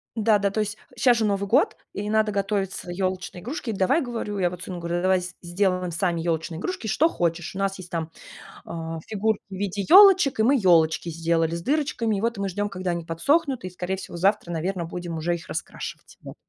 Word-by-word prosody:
Да-да, 210 -3 +3
то 200 - -3
есть 210 0 -2 0.2
щас 240 0 +4
же 225 - +1
Новый 200 -1 0
год, 275 - +3 0.2
и 205 +1 -4
надо 215 0 +2
готовиться 195 -2 -2
ёлочные 185 0 -3
игрушки. 250 - -4
"Давай,- 200 - +2
говорю, 230 -5 -4
я 180 - +2
вот 180 +1 -8
сыну 185 -1 -6
говорю,- 170 +1 -2
давай 185 0 +3 0.2
сделаем 180 0 0
сами 170 0 0
ёлочные 165 0 -2
игрушки, 235 - -4
что 310 +10 +3
хочешь". 175 - -2
У - - -4
нас 195 0 0
есть 180 -1 -9
там, 165 -1 -3 0.5
э, - - -9 0.4
фигурки 220 0 0
в - - -10
виде 200 0 -2
ёлочек, 375 - +7
и - - +4
мы 265 +5 +4
ёлочки 170 -3 +3
сделали 165 0 0
с 170 - -4
дырочками. 270 - 0
И - - -3
вот 230 0 -1
мы 200 -1 -1
ждём, 205 +2 -2
когда 185 -2 -3
они 170 -1 -3
подсохнут, 265 - +1
и 185 - -4
скорее 180 +1 -4
всего 175 - -8
завтра, 195 +1 +1
наверно, 175 +2 -2
будем 170 0 -5
уже 170 +2 0
их 170 - -10
раскрашивать. - - -6
Вот. - - -9
195 Hz, 205 wpm, -25 LUFS, 175-220 Hz, 0.5 s, ёлочек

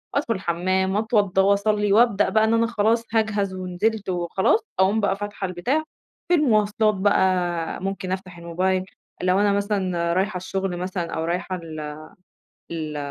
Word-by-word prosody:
أدخل 280 -5 +1
الحمام، 190 +1 0
وأتوضّى 205 -3 +2
وأصلي، 200 +1 +2
وأبدأ 220 -2 +4
بقى 220 0 +3
إن 220 +1 +2
أنا 230 0 +3
خلاص 230 0 +1
هاجهز 210 -3 +1
ونزلت 185 +3 -2
وخلاص، 180 - +1 0.2
أقوم 200 +4 +3
بقى 200 -2 +1
فاتحة 205 -1 -4
البتاع، 245 - -1 0.4
في 355 - +2
المواصلات 215 -6 +2
بقى 185 -4 +1
ممكن 195 -1 -3
أفتح 185 -2 -5
الموبايل 185 +2 -1 0.4
لو 185 +2 +3
أنا 205 -1 +3
مثلًا 185 -4 0
رايحة 190 +1 0
الشغل 185 0 -3
مثلًا 180 -2 -3
أو 160 - -2
رايحة 180 +2 -2
ال 155 -3 -7 0.7
ال 155 -2 -4
190 Hz, 145 wpm, -23 LUFS, 180-210 Hz, 0.7 s, وأبدأ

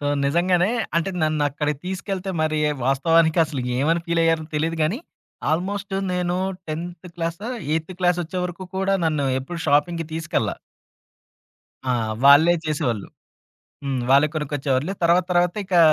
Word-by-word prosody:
So, 145 - -3 0.2
నిజంగానే 175 +6 +2 0.3
అంటే 170 +3 +1
నన్నక్కడికి 150 -1 0
తీసుకెళ్తే 190 0 -3
మరి 155 -1 0 0.3
వాస్తవానికి 160 +5 +3
అసలు 145 -5 -4 0.2
ఏమని 165 +5 +2
ఫీల్ 170 0 +1
అయ్యారో 165 -1 +2
తెలీదు 160 +2 0
గానీ. 175 +11 0 0.5
ఆల్మోస్టు 195 +4 -2 0.2
నేను 180 0 0 0.3
10థ్ 170 +3 -5
క్లాసో, 170 +6 -3 0.2
ఎయిత్ 160 +3 -2
క్లాస్ 180 -1 +2
వచ్చే 170 +3 -5
వరకు 180 +1 -5
కూడా 195 +1 +1
నన్ను 150 -4 +1
ఎప్పుడు 170 +6 -6
షాపింగ్‌కి 165 +3 +2
తీసుకెళ్ళ. 160 -1 -1 1.4
ఆ! - - +4 0.3
వాళ్ళే 150 +5 +8
చేసేవాళ్ళు. 130 -9 -1 0.8
హ్మ్. 135 -3 -1
వాళ్ళే 140 +3 +6
కొనుకొచ్చేవాళ్ళు. 145 +1 -1
తర్వాత 170 +1 +4
తర్వాత 175 +1 +2
ఇకా 185 -2 +3
165 Hz, 130 wpm, -23 LUFS, 150-180 Hz, 1.4 s, వాళ్ళే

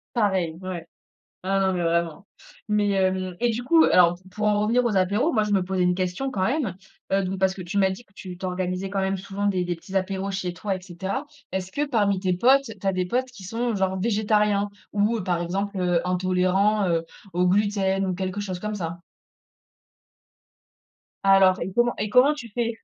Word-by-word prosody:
Pareil, 190 -7 +1
ouais. 185 -3 -6 0.6
Ah, 195 +1 +1
non, 190 -1 +2
mais 175 - -1
vraiment, 170 +2 -1 0.4
mais 210 -1 +2
hem, 185 -2 0
et 240 0 +2
du 230 +2 -3
coup, 320 +6 +5
alors, 175 -1 +5
pour 210 +3 -2
en 205 0 +2
revenir 235 +4 +2
aux 220 -5 0
apéros, 200 - +2
moi, 215 -3 +2
je 210 - -2
me 195 - +3
posais 185 0 -1
une 180 0 +3
question, 185 +9 -2
quand 190 - -2
même, 240 - 0 0.4
heu, 195 0 +3
donc 190 0 -3
parce 190 0 +2
que 190 - -7
tu 190 +4 -3
m'as 190 -1 +4
dit 190 +6 -6
que 200 - -33
tu 185 -2 -8
t - - -8
organisais, 185 +1 -2
quand 200 -1 -1
même 190 0 0
souvent, 200 +1 -4
des 185 -3 +1
des 175 -1 -2
petits 190 +4 -12
apéros 190 +1 -1
chez 185 -2 -3
toi 195 +1 -2
et 185 - -6
cetera. 190 - -4 0.3
Est-ce 190 0 -3
que, 290 +8 -1
parmi 205 -7 +1
tes 185 -1 0
potes, 260 +8 +4
tu - - -16
as 195 - +3
des 185 0 0
potes 250 +7 0
qui 215 -6 -12
sont, 230 +4 -2
genre, 190 -1 0
végétariens 210 -1 +1 0.2
ou 210 +2 +1
par 180 -3 -1
exemple, 195 +3 -3
heu, 180 -2 +2
intolérants, 185 +2 +2
heu, 165 -1 +1 0.3
au 180 +1 +2
gluten 195 0 +1
ou 185 - -1
quelque 190 +2 -3
chose 190 -3 -4
comme 210 +3 -4
ça? 170 -4 -4 2.3
Alors, 195 -1 +5
et 185 - -3
comment 240 +2 +2
et 210 - -2
comment 255 +7 +5
tu 255 -6 -9
fais? 230 +1 -2
195 Hz, 210 wpm, -24 LUFS, 185-210 Hz, 2.3 s, coup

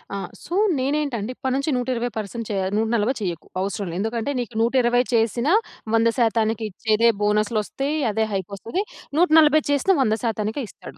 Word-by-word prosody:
ఆ! - - -2 0.3
సో, 345 - -7 0.3
నేనేంటంటే, 260 -5 -1
ఇప్పటి 260 -1 -2
నుంచి 275 +2 0
120% 245 -1 -1
పర్సెంట్ 220 +2 -4
చేయ 195 -2 -1
140 225 +2 +1
చేయకు, 175 -5 -4 0.2
అవసరం 200 0 -3
లే. - - -6
ఎందుకంటే, 230 +5 -2
నీకు 235 -2 -5
120 245 0 +3
చేసిన, 235 +3 +1 0.5
100% 225 0 +4
శాతానికి 225 -1 +1
ఇచ్చేదే 220 +4 +2
బోనస్‌లోస్తయి, 215 +7 0
అదే 220 +1 0
హైక్ 190 -1 -3
వస్తది. 230 - -3 0.4
140 310 -3 +6
చేసినా 315 +7 +3
100% 220 -3 +2
శాతానికే 220 +3 -2
ఇస్తాడు. - - -12
230 Hz, 155 wpm, -23 LUFS, 215-260 Hz, 0.5 s, 140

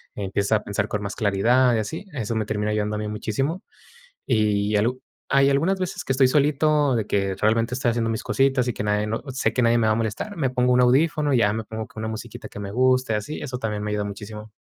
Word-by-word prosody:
empieza 100 +2 0
a 105 - -8
pensar 105 +1 -2
con 105 - -3
más 100 0 -5
claridad 120 +5 +3
y 110 - +1
así. 160 - -5
Eso 115 -5 -3
me 110 - 0
termina 105 0 -2
ayudando 105 0 -1
a - - -3
mí 105 - -3
muchísimo. 135 - -2 0.6
Y 105 -3 +1
algo 120 +5 +1 0.3
hay 135 0 +4
algunas 165 +8 +1
veces 185 0 -4
que 135 - 0
estoy 130 0 +4
solito, 150 0 +2
de 110 -2 -1
que 100 -1 0
realmente, 115 +3 +1
estoy 125 -2 +1
haciendo 115 -1 0
mis 110 - -2
cositas 135 -2 +2
y - - +1
que - - -4
nadie 105 0 +1
no 110 +1 -3
sé 130 - 0
que 125 - +1
nadie 120 0 +4
me 110 - +2
va 110 - +4
a - - -2
molestar, 115 - -3
me 135 -5 0
pongo 125 0 +2
un 125 - +4
audífono, 145 +3 +3
y 130 - +4
ya 100 -3 +3
me 110 +1 -3
pongo 110 0 -6
con 110 - -9
una 110 - -2
musiquita 110 +1 -7
que - - -10
me 100 - -5
guste, 130 -1 +2
así, 105 +9 -4
eso 125 -3 -5
también 105 -3 -3
me 105 - -3
ayuda 105 -1 -1
muchísimo. 105 +1 -8
115 Hz, 250 wpm, -23 LUFS, 105-130 Hz, 0.6 s, hay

